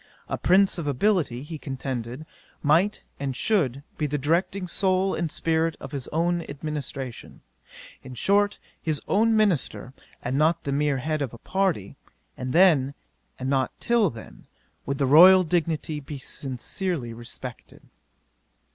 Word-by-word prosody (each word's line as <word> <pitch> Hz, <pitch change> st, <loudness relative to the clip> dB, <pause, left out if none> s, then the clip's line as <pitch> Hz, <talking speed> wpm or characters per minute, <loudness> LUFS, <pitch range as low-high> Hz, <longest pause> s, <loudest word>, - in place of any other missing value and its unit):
A -, -, -2 dB
prince 190 Hz, 0 st, +3 dB
of 155 Hz, -, -4 dB
ability, 145 Hz, -, +1 dB
he 155 Hz, +1 st, -7 dB
contended, 130 Hz, 0 st, -5 dB, 0.4 s
might 170 Hz, +8 st, +2 dB, 0.2 s
and 135 Hz, -2 st, -3 dB
should 140 Hz, -, +1 dB, 0.2 s
be 150 Hz, -, +1 dB
the 150 Hz, +1 st, -1 dB
directing 170 Hz, +6 st, 0 dB
soul 190 Hz, +1 st, +1 dB
and 165 Hz, -3 st, -2 dB
spirit 165 Hz, 0 st, 0 dB
of -, -, -8 dB
his 140 Hz, -4 st, -5 dB
own 170 Hz, +2 st, 0 dB
administration; 140 Hz, -4 st, -6 dB, 0.6 s
in 125 Hz, -1 st, -10 dB
short, 205 Hz, +8 st, +2 dB, 0.2 s
his 155 Hz, -3 st, -1 dB
own 220 Hz, +2 st, +3 dB
minister, 180 Hz, -, 0 dB, 0.3 s
and 130 Hz, +3 st, -1 dB
not 160 Hz, +2 st, +2 dB
the 140 Hz, -, -2 dB
mere 145 Hz, 0 st, +1 dB
head 155 Hz, +3 st, -2 dB
of 125 Hz, -4 st, -3 dB
a -, -, -11 dB
party: 185 Hz, -, -1 dB, 0.4 s
and 125 Hz, 0 st, -4 dB
then, 155 Hz, -6 st, +4 dB, 0.4 s
and 130 Hz, -, -4 dB
not 135 Hz, -1 st, 0 dB
till 235 Hz, -5 st, +3 dB
then, 105 Hz, -, -12 dB, 0.4 s
would 140 Hz, -, -1 dB
the 140 Hz, -, +1 dB
royal 180 Hz, +7 st, +8 dB
dignity 160 Hz, -2 st, -1 dB
be 145 Hz, +1 st, -7 dB
sincerely 135 Hz, +1 st, -4 dB
respected. 120 Hz, +1 st, -9 dB
150 Hz, 145 wpm, -25 LUFS, 135-180 Hz, 0.6 s, royal